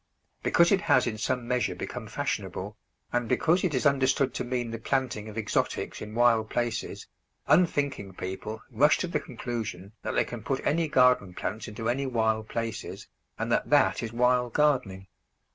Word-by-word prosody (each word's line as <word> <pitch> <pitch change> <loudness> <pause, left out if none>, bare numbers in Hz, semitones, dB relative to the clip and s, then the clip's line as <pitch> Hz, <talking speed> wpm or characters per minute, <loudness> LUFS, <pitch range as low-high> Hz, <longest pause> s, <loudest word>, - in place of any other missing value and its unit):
Because 170 0 +4
it 195 -1 +4
has 130 -11 +3
in 110 -2 -3
some 125 +1 -1
measure 125 -1 0
become - - -6
fashionable, - - -3 0.4
and 120 -2 0
because 170 +3 +2
it 170 -7 +1
is 130 - 0
understood 135 -1 +3
to - - -2
mean 120 -2 -2
the 115 - -5
planting 115 -4 -1
of 105 - -9
exotics 110 - -1
in 105 +1 -7
wild 115 -2 +3
places, 120 -2 -2 0.4
unthinking 145 - +1
people 100 +5 -6
rush 140 +6 +4
to 180 - -2
the 165 -3 -1
conclusion 115 -7 -5
that - - -3
they - - +3
can 120 -2 -7
put 135 +5 -3
any 165 +2 +2
garden 125 -9 +3
plants 110 +4 -4
into 110 +1 -5
any 135 +3 0
wild 110 -3 0
places, 110 -4 -4 0.3
and - - -2
that - - +1
that - - +4
is 115 - -4
wild 125 0 +2
gardening. 125 -11 +1
120 Hz, 175 wpm, -28 LUFS, 110-135 Hz, 0.4 s, Because